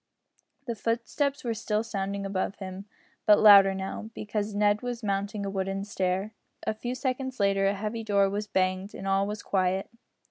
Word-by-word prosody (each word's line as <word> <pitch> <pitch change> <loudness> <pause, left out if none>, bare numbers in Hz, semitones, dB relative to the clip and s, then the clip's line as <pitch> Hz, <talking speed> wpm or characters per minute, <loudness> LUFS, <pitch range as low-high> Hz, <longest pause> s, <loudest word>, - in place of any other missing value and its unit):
The 235 - -2
footsteps 235 +6 -1
were 235 -2 -1
still 215 -1 -1
sounding 200 -2 -3
above 195 0 -2
him, 190 0 -7 0.4
but 210 - +8
louder 200 -2 +8
now, 195 +3 -5
because 210 0 -3
Ned 205 0 +3
was 245 -1 -4
mounting 200 +1 -2
a - - -2
wooden 195 0 -2
stair. 190 +1 -1 0.3
A - - 0
few 240 +3 -4
seconds 260 0 -3
later 195 -1 +3
a 200 - +1
heavy 215 +3 -4
door 200 -2 +3
was 205 +2 -3
banged, 185 0 0
and 195 - -6
all 195 +1 +2
was 210 0 -5
quiet. 190 0 0
205 Hz, 175 wpm, -28 LUFS, 195-220 Hz, 0.4 s, but